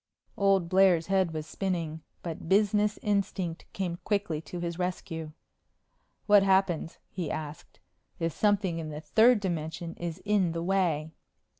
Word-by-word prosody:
Old 195 -3 +3
Blair's 185 -2 +4
head 190 -3 +3
was 155 -1 -4
spinning, 165 -1 -3 0.2
but 165 -1 -6
business 210 +1 +3
instinct 195 -4 -1
came 180 -3 -3
quickly 200 -7 -1
to 175 +2 -7
his 170 0 -4
rescue. 175 -3 -3 0.9
"What 205 -1 +7
happens," 190 -4 +2
he 175 -5 -3
asked, 155 -1 -6 0.4
"if 165 -2 -1
something 200 -5 +1
in 155 -1 -5
the 150 0 -6
third 220 - +5
dimension 170 -2 -3
is 170 -1 -4
in 200 -5 +2
the 165 0 -3
way?" 170 -5 +1
175 Hz, 140 wpm, -29 LUFS, 165-195 Hz, 0.9 s, What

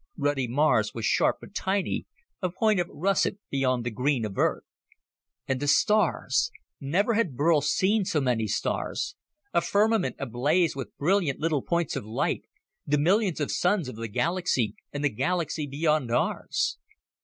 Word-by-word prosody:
Ruddy 145 -3 0
Mars 120 -5 +2
was 115 - -3
sharp - - +2
but - - -13
tiny, 195 0 -1 0.3
a 185 - 0
point 210 +3 +1
of 175 - 0
russet 195 +3 0
beyond 130 -3 +1
the 120 - -2
green 125 +1 0
of 100 -2 -6
Earth. - - +1 0.8
And 130 -2 0
the 145 - -2
stars 210 - +2 0.3
never 185 - +1
had 210 - 0
Burl 150 +2 +3
seen 190 +9 +2
so 180 -5 +1
many 120 -5 0
stars 150 - -2 0.4
a 170 - +3
firmament 215 +1 +2
ablaze 140 +7 +1
with 130 -6 -7
brilliant 170 -2 +1
little 155 -3 0
points 170 0 -1
of - - -3
light 110 +2 -2 0.4
the 150 +1 +1
millions 185 +3 +2
of 145 - -1
suns 180 -3 +1
of 130 - -7
the 115 +1 -5
galaxy 135 - 0 0.2
and 145 0 -4
the 145 - +3
galaxies 160 +1 -1
beyond 150 -2 +1
ours. 120 - 0
150 Hz, 160 wpm, -27 LUFS, 130-180 Hz, 0.8 s, Burl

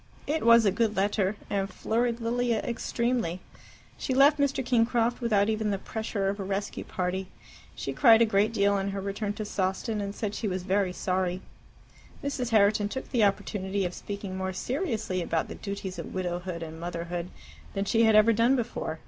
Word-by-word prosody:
It 310 +2 -1
was 230 -1 +7
a 200 - +4
good 215 +1 0
letter, 200 0 +1
and 195 -1 -1
flurried 235 +2 -1
Lilia 235 0 +1
extremely. 235 -6 -1 0.6
She 260 - -1
left 285 +2 +6
Mr. 275 -2 +1
Kingcroft 240 0 +2
without 210 -4 +2
even 215 -1 0
the 200 - 0
pressure 210 -1 -3
of 200 +1 -2
a - - -2
rescue 195 +1 -3
party. 185 +1 -3 0.5
She - - -4
cried 230 -5 +7
a 230 - +6
great 210 0 +2
deal 200 -2 +2
on 195 0 0
her 195 0 -3
return 200 +1 -3
to 215 - -5
Sawston, 205 +3 -1
and 200 0 -4
said 210 -2 -3
she 215 - -3
was 185 -2 -2
very 190 0 +1
sorry. 185 0 -1 0.8
Mrs. 275 -4 -2
Herriton 210 -1 +3
took 265 +4 -6
the 235 -4 +3
opportunity 195 -1 0
of 175 - -3
speaking 200 -1 -6
more 190 0 -3
seriously 235 - -2
about 165 -1 -1
the - - -5
duties 195 -3 -6
of 170 - -7
widowhood 175 -1 -3
and 160 0 -8
motherhood 170 +1 -4 0.5
than 195 0 0
she 225 +3 +3
had 220 -1 +5
ever 215 +2 +6
done 230 +4 +4
before. 225 -9 -3
205 Hz, 185 wpm, -28 LUFS, 190-230 Hz, 0.8 s, was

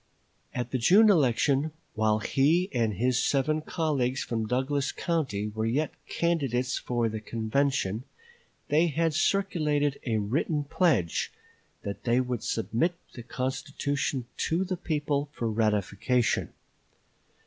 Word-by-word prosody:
At 120 -1 -3
the 130 - 0
June 205 - +6
election, 145 - +2 0.2
while 110 0 +2
he 155 - +2
and 115 -4 +1
his 125 +5 +1
seven 155 +3 +1
colleagues 145 -6 -1
from 115 -2 -2
Douglas 135 +3 0
County 140 -12 -1
were 110 +1 -2
yet 145 +7 0
candidates 135 -7 0
for 120 -2 0
the 110 0 -3
convention, 115 0 -1 0.6
they 155 +4 +4
had 165 +1 0
circulated 150 -5 +1
a 115 -4 0
written 145 +8 0
pledge 140 - +1 0.5
that 100 0 -5
they 120 +1 +3
would 125 -3 -2
submit 120 +10 0 0.2
the 120 - -8
constitution 135 +1 -2
to 170 +3 0
the 185 0 -2
people 150 -3 -1
for 115 - -2
ratification. 110 +2 +1
135 Hz, 125 wpm, -28 LUFS, 115-155 Hz, 0.6 s, June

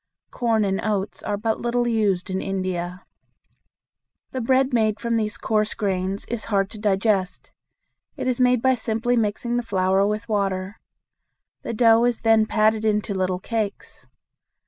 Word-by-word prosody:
Corn 225 -3 +1
and 195 0 -1
oats 205 -2 -2
are 205 - -2
but 220 +1 -1
little 240 0 0
used 205 -5 0
in 190 - -1
India. 185 -2 -3 1.3
The 260 - -3
bread 260 +2 +2
made 220 -2 +2
from 235 0 -1
these 215 -2 -1
coarse 215 0 0
grains 195 -2 -2
is 235 -2 -4
hard 195 -3 0
to 215 - -10
digest. 195 -2 0 0.7
It - - -3
is 255 -1 0
made 250 -2 +3
by 260 0 +4
simply 230 +1 0
mixing 235 +2 -1
the - - +1
flour 195 -3 +1
with 210 +2 -3
water. 195 -2 -2 0.8
The 230 - -5
dough 230 0 +5
is 245 -2 0
then 225 -1 +4
patted 215 0 +2
into 210 -1 0
little 185 -1 -1
cakes. 220 0 -4
215 Hz, 155 wpm, -23 LUFS, 195-230 Hz, 1.3 s, dough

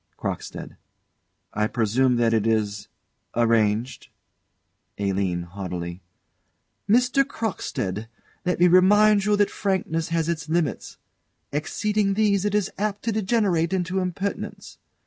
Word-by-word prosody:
CROCKSTEAD. - - -6 0.8
I 105 0 +1
presume 125 +3 +1
that 115 -1 +2
it 110 -1 +1
is 105 -2 0 0.5
arranged? 115 0 +1 0.9
ALINE. 95 -3 -1
[Haughtily.] 90 -1 -6 0.9
Mr. 250 +4 +4
Crockstead, 115 - -4 0.4
let 180 -2 -1
me 180 - +6
remind 200 +3 +5
you 210 0 +3
that 205 -1 +2
frankness 175 -5 -1
has 165 -1 0
its 155 -3 -3
limits: 160 -5 -1 0.5
exceeding 200 +7 0
these, 205 -2 +2
it 205 0 0
is 210 -3 0
apt 205 -1 -2
to 230 - 0
degenerate 200 -5 +1
into 185 0 0
impertinence. 190 +2 -4
170 Hz, 115 wpm, -24 LUFS, -, 0.9 s, me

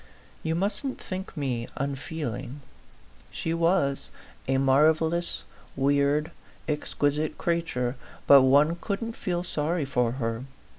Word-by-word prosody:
You 160 0 -1
mustn't 205 +9 -1
think 185 -2 -6
me 125 -5 -2
un 140 -1 -1
feeling. 145 -1 -5 0.7
She 165 - -3
was 165 -4 +1 0.4
a 135 0 +2
marvellous, 155 +5 +2 0.3
weird, 140 +2 +2 0.4
exqui 145 -1 0
site 155 0 -2
creature, 140 -7 -1 0.3
but 140 -1 +9
one 145 +5 +4
couldn't 225 +3 -3
feel 175 -1 -2
sorry 160 -1 -1
for 125 -3 +1
her. 115 -1 -3
150 Hz, 115 wpm, -27 LUFS, 135-170 Hz, 0.7 s, but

